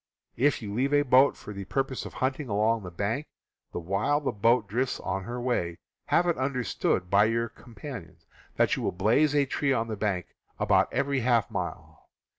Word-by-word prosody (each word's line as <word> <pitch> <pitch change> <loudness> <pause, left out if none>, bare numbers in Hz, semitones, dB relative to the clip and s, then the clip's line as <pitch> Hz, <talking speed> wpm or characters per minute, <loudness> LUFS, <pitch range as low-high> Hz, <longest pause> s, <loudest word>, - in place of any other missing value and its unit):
If 135 0 +2
you 100 -1 -5
leave 135 +6 +1
a 145 - +4
boat 130 +1 +5
for 105 - -9
the 100 -1 -6
purpose 135 +4 -2
of - - -12
hunting 130 0 -2
along 110 +2 +2
the 90 - -7
bank 105 - -2 0.4
while 100 - 0
the 145 - -1
boat 115 +2 +2
drifts 125 +6 -1
on 95 0 -3
her 120 +1 -4
way, 105 -9 -1 0.3
have 175 - +3
it 175 -5 0
understood 125 -8 -1
by 100 +1 +6
your 115 +1 0
compan 115 - -9
ions - - -25 0.3
that - - +3
you - - -4
will - - -1
blaze 120 +11 +3
a 145 -1 +4
tree 135 +1 0
on 115 -2 -1
the 110 - -2
bank 100 -4 -2 0.3
about - - +3
every 140 -1 0
half 120 -2 +2
mile. - - -6
115 Hz, 195 wpm, -28 LUFS, 100-135 Hz, 0.4 s, by